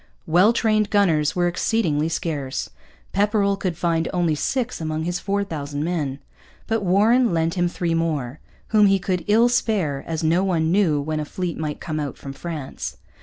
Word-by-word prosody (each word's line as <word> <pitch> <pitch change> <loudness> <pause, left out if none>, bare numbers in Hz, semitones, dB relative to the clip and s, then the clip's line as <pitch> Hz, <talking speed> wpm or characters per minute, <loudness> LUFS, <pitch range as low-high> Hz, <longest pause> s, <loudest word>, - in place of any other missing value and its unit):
Well 180 +6 +5
trained 215 -3 +1
gunners 165 -8 +2
were 175 -1 +2
exceedingly 170 -4 0
scarce. 145 -5 -3 0.4
Pepperrell 200 0 +2
could 185 -4 -3
find 165 -1 0
only 175 -3 +1
six 245 - -2
among 155 0 -2
his 175 +1 -2
four 200 +1 -1
thousand 145 -5 -4
men. 155 -6 -2 0.5
But 225 -1 0
Warren 220 +6 +4
lent 165 0 +1
him 175 -1 +1
three 170 -1 -2
more, 155 -5 -1 0.3
whom 210 -2 +5
he 195 0 +4
could 180 -2 -2
ill 225 +3 +5
spare, 200 - 0
as 160 -1 -3
no 170 +4 +3
one 165 -4 +1
knew 175 -6 +3
when 155 +2 -2
a - - -1
fleet 175 +2 -4
might 150 -2 -3
come 155 -2 -4
out 145 -3 -4
from 135 - -8
France. 155 -2 -6
170 Hz, 175 wpm, -22 LUFS, 155-200 Hz, 0.5 s, Well